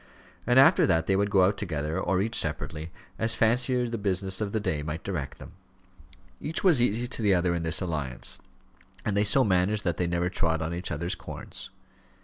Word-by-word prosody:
And 125 +1 +3
after 140 +7 +6
that 80 -3 +2
they 95 - +2
would 100 +1 +1
go 95 -2 +4
out 100 +1 +2
together, 80 -5 -3
or 95 +1 +1
each 115 +2 -3
separately, 80 -2 -2 0.3
as 115 0 +2
fancy 120 +3 +2
or 125 -1 0
the 115 -1 -4
business 95 0 -1
of 105 -2 -2
the 110 - 0
day 80 -8 -2
might 75 +2 -5
direct 65 -1 -4
them. - - -11 0.9
Each 160 - -3
was 170 -10 +5
easy 120 0 +1
to 120 - -3
the 100 -3 +3
other 90 0 +1
in 85 - -2
this 80 +3 0
alliance, 75 -8 -1 0.7
and 105 - 0
they 100 - +3
so 130 +6 +5
managed 100 +1 +1
that 85 -3 -1
they 90 - 0
never 85 +1 0
trod 80 -3 0
on 80 +2 -3
each 90 +1 -4
other's 85 +4 -2
corns. - - -9
95 Hz, 210 wpm, -27 LUFS, 85-110 Hz, 0.9 s, after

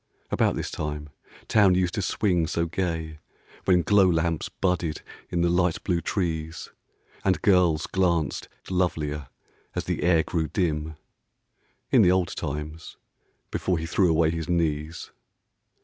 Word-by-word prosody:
About - - +2
this - - -4
time 75 0 -4 0.4
Town 100 -4 +5
used 90 -1 +1
to 105 - -1
swing 90 -4 +1
so 85 0 0
gay 80 -3 -3 0.5
When 90 -2 +4
glow 100 -1 +5
lamps 80 -1 0
budded 85 -4 -1 0.3
in 85 - 0
the 85 - +3
light 90 -1 +1
blue 85 -3 0
trees 80 -4 -3 0.5
And 95 -1 +2
girls 90 -6 +4
glanced 85 -5 0 0.2
lovelier 75 -6 -1 0.5
as - - -1
the - - -2
air 85 -2 +4
grew 80 -1 -1
dim, 80 -2 -1 0.5
— - - -44
In - - +6
the - - +5
old 90 -2 +2
times, 75 +2 -5 0.5
before 90 -2 0
he 80 - -3
threw 90 +2 +2
away 80 0 +3
his 80 0 -4
knees. 80 -2 -1
85 Hz, 145 wpm, -26 LUFS, 80-90 Hz, 0.5 s, In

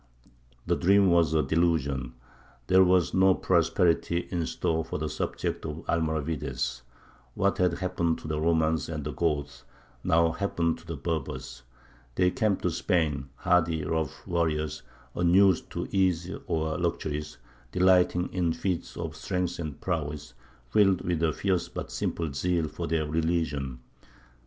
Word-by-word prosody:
The - - +2
dream 100 0 +4
was 85 -3 +4
a 75 - +3
delusion. 70 -7 0 0.5
There 95 +6 +6
was 90 -2 +3
no 95 0 +5
prosperity 85 0 +1
in 85 -2 -1
store 80 0 -1
for 80 - -4
the 75 0 -2
subjects - - -3
of 75 +1 -7
the - - 0
Almoravides. 75 -6 -2 0.5
What 100 0 +1
had 90 -2 +3
happened 85 -3 -1
to - - -9
the 75 0 -2
Romans 80 -1 +1
and 75 -3 -4
the 75 - -3
Goths 70 -4 -2 0.4
now 85 0 +3
happened 85 -2 -1
to 85 - -18
the 85 - -4
Berbers. 70 -4 -4 0.5
They 90 0 +3
came 110 -6 +1
to 90 - 0
Spain 80 -5 0
hardy 85 -1 +2
rough 80 -2 -2
warriors, 80 -3 -1 0.3
unused 90 +1 +4
to - - -3
ease 90 -2 +1 0.2
or 80 +1 -1
luxuries, 75 -3 -2 0.3
delighting 90 -1 +3
in 85 -3 +1
feats 90 -2 -3
of 80 -2 -4
strength 90 +2 -2
and 75 -5 -5
prowess, 75 -4 -3 0.4
filled 95 -1 +4
with 85 -2 -1
a 80 -1 +3
fierce 95 -1 -1
but - - -6
simple 80 -4 -2
zeal 85 +2 0
for - - -5
their 80 0 0
religion. 75 -5 -1
80 Hz, 145 wpm, -28 LUFS, 75-90 Hz, 0.5 s, There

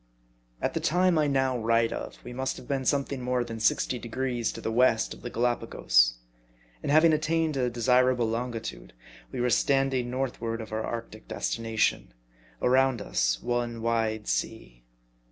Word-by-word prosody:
AT - - 0
the - - -1
time 180 0 +2
I 150 - +2
now 135 -2 +1
write 115 0 +2
of, - - -6
we 125 - -8
must 130 +1 -2
have - - -11
been 135 -2 -1
some 140 0 +2
thing 135 -2 -5
more 125 0 0
than 115 -1 -7
sixty 120 +2 +1
degrees 120 +1 -2
to - - -7
the 110 - -3
west 115 -1 +3
of - - -14
the 120 - -5
Gallipagos. 115 - +2 0.7
And - - -2
having 155 +2 +6
attained 155 0 +1
a 125 -2 +1
desirable 125 0 +2
longitude, 115 - -4 0.4
we - - -5
were 125 0 +1
stand 135 +3 +2
ing 125 -2 -1
northward 115 -3 -3
for 110 0 -3
our 110 - -3
arctic 115 -2 -7
destination: 110 - -1 0.5
around 130 -1 +3
us - - 0
one 120 -1 -2
wide 110 -2 0
sea. - - -3
120 Hz, 170 wpm, -27 LUFS, 115-130 Hz, 0.7 s, having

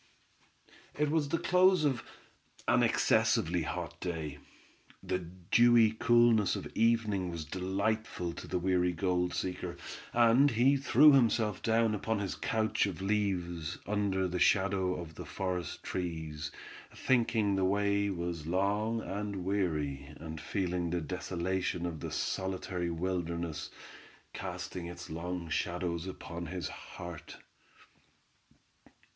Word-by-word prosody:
It 150 0 +1
was 155 -3 +1
the 165 - +1
close 180 -1 +4
of 130 -5 0 0.6
an - - +4
excessively 85 +2 +3
hot 75 - -4
day. 80 -5 -4 0.6
The 95 -1 -1
dewy 110 +6 +4
coolness 115 -2 +4
of - - -5
evening 110 -5 +2
was 85 -2 -5
delightful 95 +1 -2
to - - -8
the - - -1
weary 90 0 +1
gold 90 0 0
seeker, 90 -1 -3 0.3
and 120 +4 +5
he 125 +3 +4
threw 140 +2 +6
himself 115 -5 +3
down 115 -1 +2
upon 110 +1 -1
his 100 -2 -2
couch 110 -2 0
of 95 -4 -5
leaves, 90 -5 -1
under 100 -2 0
the 90 0 -3
shadow 95 -1 +3
of 85 -2 -8
the - - -8
forest 90 -2 -4
trees, 80 -4 -4 0.4
thinking 115 -5 +2
the 95 - +1
way 100 +1 +2
was 85 -4 -4
long 105 +5 +1
and 100 -2 -4
weary, 75 -8 -1
and 80 -1 -7
feeling 90 -3 -1
the 90 +1 0
desolation 90 +1 -2
of 85 -3 -4
the - - -5
solitary 95 -2 -2
wilderness, 85 -2 -3 0.6
casting 85 -2 -5
its 85 0 -8
long 85 +1 -4
shadows 85 +1 -2
upon 85 -2 -6
his 90 -2 -4
heart. 85 -4 -9
95 Hz, 125 wpm, -32 LUFS, 85-110 Hz, 0.6 s, threw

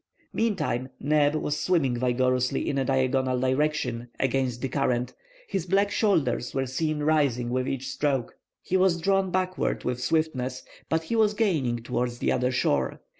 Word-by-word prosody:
Meantime, 150 - -1
Neb 150 +1 +2
was 150 -1 -1
swimming 155 -9 +1
vigorously 125 +1 +1
in 140 - 0
a - - +1
diagonal 130 -1 +1
direction, 130 -2 0
against 130 -2 0
the 135 - -2
current; 125 -2 0 0.3
his 185 -2 -3
black 200 +2 +2
shoulders 140 - +1
were 135 0 +1
seen 150 +4 -2
rising 140 -6 +1
with 130 +1 0
each 135 0 -3
stroke. 135 -3 -1 0.3
He 185 - -2
was 185 -2 +3
drawn 195 +2 +2
backward 185 0 -1
with 125 0 -2
swiftness, 130 -4 -1 0.3
but 160 0 +1
he 230 - -2
was 215 -2 +3
gaining 140 - 0
towards 120 0 -2
the - - 0
other 125 0 +1
shore. 125 - 0
135 Hz, 160 wpm, -26 LUFS, 125-160 Hz, 0.3 s, was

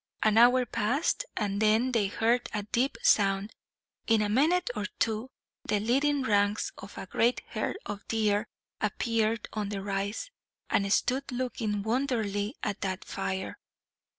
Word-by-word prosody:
An 215 0 +4
hour 250 +1 +6
passed, 245 - 0
and 200 -1 -1
then 220 +4 +3
they 220 -5 +2
heard 230 +4 +1
a 210 - -1
deep 240 +6 0
sound. 200 - +3 0.5
In 225 -2 +4
a 205 - -1
minute 305 +7 +2
or 210 -1 -2
two 225 +3 -1 0.3
the 210 - 0
leading 275 +6 +2
ranks 205 -2 +1
of 195 - -10
a - - -5
great 235 +6 +1
herd - - -2
of 205 0 -6
deer 215 -1 +1 0.3
appeared 225 0 0
on 210 -2 -2
the 200 -2 -4
rise, 200 - -3 0.4
and 200 0 +2
stood 265 +6 +1
looking 235 -5 -2
wonderingly 220 -2 -1
at 205 -2 -2
the 190 -1 -1
fire. 190 -1 -4
220 Hz, 150 wpm, -29 LUFS, 205-245 Hz, 0.5 s, hour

